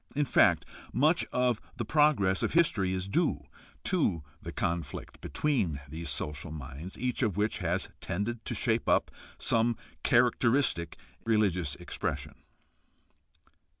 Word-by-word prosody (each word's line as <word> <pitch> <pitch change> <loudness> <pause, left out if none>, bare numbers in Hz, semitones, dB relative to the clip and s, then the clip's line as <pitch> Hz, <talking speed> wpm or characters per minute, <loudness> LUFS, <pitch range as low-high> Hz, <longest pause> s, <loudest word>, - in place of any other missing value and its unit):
In 145 0 +2
fact, - - +4 0.3
much 155 +7 +3
of 125 -3 +1 0.2
the 120 - -2
progress 125 -10 +3
of - - 0
history 120 - +3
is 95 0 -2
due 100 - 0 0.4
to 80 -3 +1 0.2
the - - -6
conflict 85 -4 -3
between 110 - 0
these 80 +2 -6
social 75 +2 -2
minds, 75 +4 -7
each 125 +1 -1
of 105 -6 +1
which 105 +1 0
has 90 0 -1
tended 110 +6 -3
to - - -3
shape 115 -2 +1
up - - +3 0.3
some 115 0 +2 0.2
characteristic 120 - +2 0.3
religious 100 -9 +1
expression. - - -4
105 Hz, 125 wpm, -30 LUFS, 85-125 Hz, 0.4 s, fact